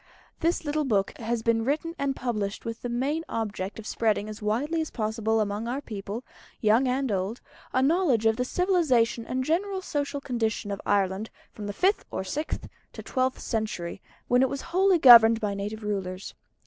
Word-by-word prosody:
This 335 0 0
little 300 +1 0
book 205 -5 0
has 230 0 -2
been 225 -1 +2
written 300 +6 -1
and 275 -1 0
published 210 -6 -3
with 230 0 -5
the 245 - -4
main 275 +7 -1
object 210 -3 -3
of 220 - -8
spreading 215 -2 0
as 215 0 -8
widely 270 +11 0
as 315 - -3
possible 220 0 -1
among 210 +1 -1
our 255 +3 -2
people, 215 -2 -6 0.4
young 225 +4 +3
and 260 -1 0
old, 195 +4 -2 0.3
a 260 - +2
knowledge 285 - +2
of 220 0 +4
the 250 - 0
civilisation 255 -9 +1
and 260 +1 -1
general 380 +7 0
social 285 -3 -2
condition 225 -6 -2
of 200 - -4
Ireland 200 +1 +1 0.2
from 210 -1 -7
the - - -2
fifth 375 - +1
or - - -3
sixth 295 +12 -3 0.3
to - - -8
the - - -16
twelfth 255 -1 0
century, 210 -6 -3 0.3
when 245 +1 +4
it 265 - +3
was 275 +1 -4
wholly 380 0 +4
governed 230 -5 +9
by 210 -3 -1
native 205 +2 -5
rulers. 195 -2 -4
230 Hz, 185 wpm, -27 LUFS, 210-280 Hz, 0.4 s, governed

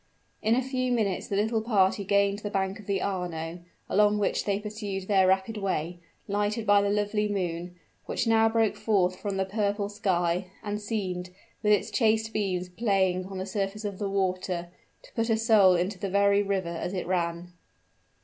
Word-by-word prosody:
In 225 +2 +3
a 260 - +1
few 255 -1 -1
minutes 210 -6 0
the 200 - -2
little 220 +2 +1
party 200 -3 +2
gained 200 +1 +2
the 210 - -4
bank 195 0 -1
of 210 - -13
the 200 -1 0
Arno, 175 -3 -3 0.3
along 210 +1 +3
which 205 - 0
they 200 -1 0
pursued 205 -3 -5
their 190 -2 +4
rapid 190 +4 +1
way, 175 -4 -2 0.3
lighted 205 +2 -1
by 205 -1 +5
the 200 - +1
lovely 210 +1 0
moon, 175 -3 -3 0.3
which - - -1
now 225 -1 +4
broke 225 -1 +2
forth 185 -4 +1
from 200 -2 -3
the 190 - +1
purple 205 0 -1
sky, 180 -3 0 0.2
and 210 0 -3
seemed, 185 -4 -3 0.3
with 210 -1 +2
its 205 - +1
chaste 220 -2 +2
beams 185 -4 -1
playing 190 -2 0
on 195 -1 -7
the 185 - -3
surface 200 +2 -3
of 200 -2 -4
the 200 -2 -1
water, 185 -2 -1 0.3
to - - -18
put 230 0 -1
a 225 - +3
soul 215 -5 +5
into 180 +2 -1
the 195 - -3
very 200 +1 +4
river 195 -3 -1
as 170 +3 -4
it 180 - -2
ran! 175 -1 -2
200 Hz, 190 wpm, -27 LUFS, 185-210 Hz, 0.3 s, by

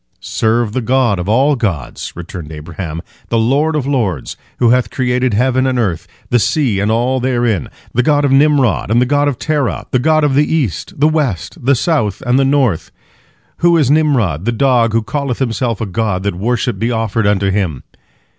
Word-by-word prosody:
"Serve 110 -1 0
the 130 - -1
God 120 -4 +1
of 90 +3 -4
all 135 +6 +3
gods," 85 - -3
returned 85 -2 -8
Abraham, 80 +1 -6 0.3
"the 115 - +1
Lord 140 +8 +1
of 145 -4 -1
lords, 110 - -2 0.2
who 120 -2 +3
hath 125 -3 +2
created 125 -2 0
heaven 130 +3 +2
and 130 -1 0
earth, 95 -9 -1 0.2
the 120 - +4
sea 120 -5 +1
and 100 +2 0
all 120 +4 +1
therein—the 120 - -1
God 145 +2 +2
of 140 - +1
Nimrod 135 -7 +3
and 115 +2 +3
the 125 - +3
God 145 +2 +1
of 140 -4 -1
Terah, 150 -3 -1
the 130 - +2
God 155 +3 +2
of 145 -2 +2
the 145 +2 +2
east, 160 - -2
the 150 - +4
west, 140 - -2
the 140 +2 +3
south, 115 - -1
and 125 +2 +2
the - - +3
north. 135 - +1 0.7
Who 170 0 +3
is 145 -4 +2
Nimrod, 125 - +1
the 120 - +1
dog, 120 -2 +2
who 115 -1 +1
calleth 130 +2 -3
himself 120 -3 -1
a 115 - -2
god, 100 -2 -2
that 100 - -1
worship 120 +6 -2
be 115 - 0
offered 115 -2 0
unto 100 -1 +1
him?" 95 -9 -2
120 Hz, 195 wpm, -15 LUFS, 105-135 Hz, 0.7 s, the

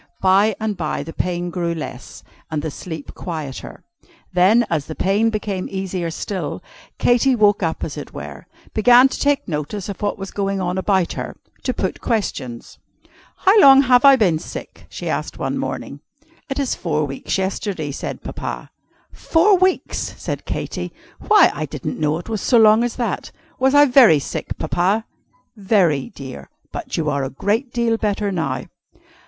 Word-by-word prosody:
By 195 +3 +4
and 215 -1 -2
by 160 -4 -3
the 165 - -8
pain 175 -1 -2
grew 170 -1 -2
less, 155 - -8 0.3
and 150 -2 -3
the 160 - -3
sleep 160 -1 -8
quieter. 155 -7 -7 0.5
Then, 200 +7 +4
as 155 -4 -2
the 155 - -6
pain 205 +4 +2
became 205 -4 -3
easier 190 -3 -3
still, 185 +4 -4 0.3
Katy 245 +2 +3
woke 205 -3 +3
up 165 -3 -2
as - - -5
it - - -7
were - - -9 0.3
began 245 +4 +6
to - - -5
take 285 -1 +1
notice 170 +6 -4
of 200 - -7
what 205 -1 -1
was 195 -1 -7
going 195 -1 -1
on 180 0 -1
about 190 -2 +1
her; - - -6 0.2
to - - -1
put - - -3
questions. 140 - -3 0.7
"How 395 +3 +7
long 275 -4 +8
have 250 -1 +4
I 275 -1 +9
been 185 -10 +2
sick?" - - -9
she - - -7
asked - - -3
one - - -2
morning. - - -4 0.5
"It 270 - -3
is 275 -3 0
four 155 -3 -1
weeks 135 +5 -3
yesterday," 190 -5 -2
said - - -6
Papa. - - -6 0.4
"Four 375 +5 +3
weeks!" 375 0 0
said - - -5
Katy. - - -4 0.4
"Why, 420 -4 +6
I 155 - -4
didn't 145 -1 -5
know 150 0 +1
it 175 - -9
was 220 -3 -3
so 245 - +3
long 220 +1 +6
as 240 -1 -2
that. 245 - -3 0.3
Was 265 +2 +3
I 290 0 +8
very 245 - +7
sick, 140 - -5
Papa?" 195 +6 0 0.5
"Very, 190 - +2
dear. 130 - -10 0.2
But - - -5
you 160 - -1
are 140 -2 0
a 135 - -2
great 220 - -1
deal 235 -1 +1
better 205 -1 -1
now." 170 -4 -2
195 Hz, 170 wpm, -20 LUFS, 165-230 Hz, 0.7 s, I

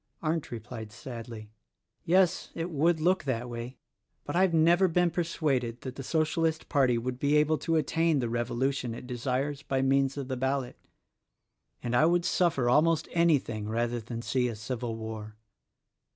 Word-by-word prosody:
Arndt 160 0 -1
replied 115 -1 -7
sadly: 115 -2 -8 0.5
"Yes; 185 +1 +2
it 165 +2 -3
would 160 +2 +2
look 180 +1 +2
that 125 -2 -2
way; 120 +1 -6 0.5
but - - -5
I 180 - +4
have 190 -2 +4
never 170 +3 +4
been 175 0 +2
persuaded 140 -8 -1
that 130 - -6
the - - -6
Socialist 160 +2 0
Party 130 -5 +3
would 125 +2 -3
be 145 +2 +2
able 150 +1 +2
to 165 - 0
attain 160 +1 +2
the 125 -3 0
revolution 120 +1 -1
it 125 - -9
desires 130 +3 -2
by 135 -2 -1
means 135 +1 +2
of 140 -2 -4
the 130 - -2
ballot, 130 0 -1 0.5
— - - -43
and 120 0 -1
I 155 +6 +5
would 175 0 +2
suffer 165 -9 +2
almost 155 +5 +3
anything 140 -11 +1
rather 120 +2 -1
than 115 +1 -6
see 125 0 +1
a 115 - -4
civil 115 +1 -4
war. 110 -1 -7
135 Hz, 170 wpm, -29 LUFS, 120-160 Hz, 0.5 s, I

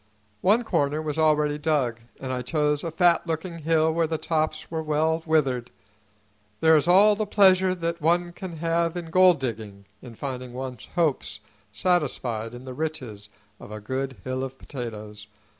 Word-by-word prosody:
One 215 +6 +4
corner 145 -8 0
was 155 0 -3
already 150 -1 +2
dug, 145 -7 0 0.2
and 130 -1 -4
I 125 - -2
chose 150 +2 0
a 170 - -2
fat 170 +1 +3
looking 165 +1 -4
hill 160 0 +2
where 165 0 +1
the 160 0 -2
tops 155 0 -2
were 160 -1 -2
well 160 +1 0
withered. 135 -6 +1 0.9
There 160 0 +5
is 150 +1 +2
all 200 +4 +6
the 215 0 -2
pleasure 190 -2 +4
that 170 -1 -3
one 175 +2 +1
can 175 -2 -8
have 165 +1 0
in 165 -2 -6
gold 185 -2 +5
digging 110 -6 -5 0.2
in 120 -2 -11
finding 130 -1 -5
one's 130 -2 -6
hopes 150 - 0 0.3
satisfied 120 - -1
in 125 +2 -10
the 130 - -7
riches 125 -9 -5 0.3
of - - -11
a 110 - -6
good 130 +5 -4
hill 130 0 -3
of 135 0 -6
potatoes. 105 -6 -8
155 Hz, 170 wpm, -25 LUFS, 130-165 Hz, 0.9 s, all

